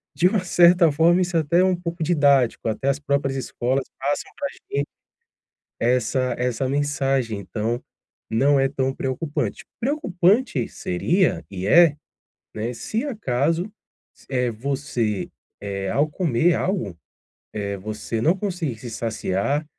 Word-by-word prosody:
de 180 - +4
uma 190 0 +1
certa 175 -1 +5
forma, 165 +5 +4
isso 180 -1 0
até 160 +2 +2
é - - +4
um 190 - +3
pouco 170 -1 -4
didático. 140 -9 +3
Até 130 +5 -1
as 140 +1 0
próprias 140 -2 0
escolas 130 +1 -1
passam 140 +2 -1
para 285 - -2
a - - -12 0.2
gente - - 0 0.9
essa 125 +2 +1
essa 125 +1 -1
mensagem, 135 -5 0
então 110 +4 -3 0.5
não 135 +5 +3
é 135 - +3
tão 135 -1 -1
preocupante. 135 +3 -3 0.2
Preocupante 210 - +1
seria, 170 - 0
e 95 -1 -4
é, 165 +5 +6 0.6
né, 115 +3 -3
se 220 - -3
acaso, 165 - -1 0.6
eh, 125 -2 0
você, 120 -4 -2 0.3
eh, 100 -1 -3
ao 145 +2 +2
comer 165 0 +2
algo, 180 - -1 0.6
eh, 100 -1 -3
você 110 +3 -4
não 165 +9 +3
conseguir 175 - -3
se 120 +2 -8
saciar, 115 +6 -1
140 Hz, 135 wpm, -23 LUFS, 120-170 Hz, 0.9 s, é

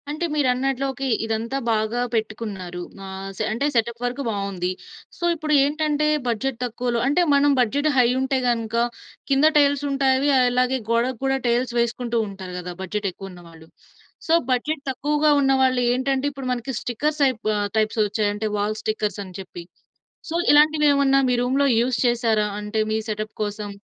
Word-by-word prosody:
అంటే 305 +4 -2
మీరన్నట్లోకి 270 -1 0 0.2
ఇదంతా 225 +4 -2
బాగా 220 +2 0
పెట్టుకున్నారు, 210 -5 -4 0.3
ఆహ్, 190 0 -7
సే - - -1
అంటే 235 +6 -1
సెటప్ 235 +1 0
వర్‌కు 245 +3 -2
బావుంది. 195 -4 -2 0.5
సో, - - -10
ఇప్పుడేంటంటే 300 0 +1 0.2
బడ్జెట్ 240 +2 -1
తక్కువలో 240 0 -2
అంటే 290 +6 +3
మనం 285 +1 +4
బడ్జెట్ 280 +6 +2
హై 250 -2 +5
ఉంటే 265 0 0
గనుక 230 -2 -1 0.6
కింద 275 +2 +4
టైల్సుంటాయి 280 -2 +2
అవి 285 +2 +1
అలాగే 250 +1 +2
గోడకి 235 +1 +1
కూడా 270 0 +1
టైల్స్ 240 +1 +1
వేసుకుంటూంటారు 225 -6 -2
కదా! 180 0 -6
బడ్జెట్ 200 +2 -3
ఎక్కువున్నవాళ్ళు. 175 -4 -12 0.6
సో, 325 - +2 0.2
బడ్జెట్ 275 +4 -1
తక్కువగా 295 +3 +1
ఉన్నవాళ్ళేంటంటే 260 0 +2
ఇప్పుడు 270 -2 -6
మనకి 250 +2 -4
స్టిక్కర్స్ 295 +6 -2
అయిపు 240 -5 -3
ఆ - - 0 0.2
టైప్సోచ్చాయి 215 -1 +1
అంటే 215 +1 -2
వాల్ 210 +1 -1
స్టిక్కర్స్ 215 -2 -2
అని 185 -1 -12
చెప్పి. 180 -2 -9 0.7
సో, 325 - -3 0.2
ఇలాంటివేమన్నా 290 -2 +4
మీ - - +2
రూమ్‌లో 270 +3 +2
యూజ్ 245 +1 0
చేసారా? 230 -3 +1
అంటే 210 +1 -3
మీ 220 - +1
సెటప్ 215 0 -4
కోసం? 210 0 -4
245 Hz, 145 wpm, -23 LUFS, 215-275 Hz, 0.7 s, హై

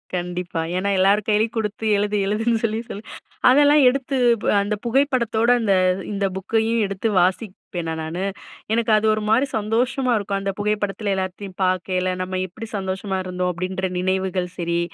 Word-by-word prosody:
கண்டிப்பா, 175 -1 -3 0.2
ஏன்னா 195 +2 0
எல்லார் 200 +2 +3
கையிலயும் 220 +2 +1
குடுத்து 220 0 -3
எழுது 205 +1 0
எழுதுன்னு 225 +3 0
சொல்லி 220 0 0
சொல்லி. 205 - -7 0.5
அதெல்லாம் 290 +2 +6
எடுத்து 270 +1 -2 0.5
அந்த 205 +1 -1
புகைப்படத்தோட 235 -3 +1
அந்த 210 -4 +2 0.4
இந்த 200 -1 -1
புக்கையும் 225 +4 0
எடுத்து 195 +3 -2
வாசிப்பேனா 180 -3 -2
நானு 165 +4 -4 0.5
எனக்கு 230 -1 +1
அது 215 - 0
ஒரு 215 - -1
மாரி 250 +5 +4
சந்தோஷமா 245 +4 0
இருக்கும். 200 -1 -2
அந்த 195 - -1
புகைப்படத்தில 205 -1 -1
எல்லாத்தையும் 185 0 -5
பார்க்கயில, 185 0 0
நம்ம 185 0 -3
எப்படி 220 +5 -9
சந்தோஷமா 190 0 -3
இருந்தோம் 180 0 -1
அப்படின்ற 185 +2 -3
நினைவுகள் 185 -1 -1
சரி. 170 -1 -1
200 Hz, 145 wpm, -22 LUFS, 185-225 Hz, 0.5 s, அதெல்லாம்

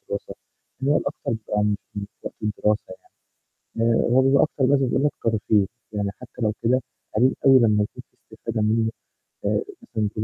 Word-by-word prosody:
دراسة. - - -4 0.5
هي 145 +2 +3
الأكتر - - -3
بيبقى 105 -2 -1
مش 105 -1 +2 0.2
مش 100 -1 -4 0.2
وقت - - -5
الدراسة 105 0 +1
يعني. 95 - -14 0.8
آآ - - +3
هو 130 +2 +5
بيبقى 135 +1 +5
أكتر 150 -3 -1
بس 140 +1 +4
زي 130 -2 +1
ما 135 - +1
قلت - - -19
ترفيه. 110 -2 +2 0.3
يعني 100 -1 -1
حتى 125 - -11
لو 110 -1 +2
كده، 130 +3 +3 0.3
قليل 130 +4 +4
أوي 135 -1 +8
لما 105 -3 +4
يكون 125 +4 -7
في - - -39 0.2
استفادة 110 0 -3
منه، 110 +1 +2 0.5
آآ - - +2 0.2
مثلًا 110 - -2
تقول 105 - -1
110 Hz, 190 wpm, -24 LUFS, 105-130 Hz, 0.8 s, أوي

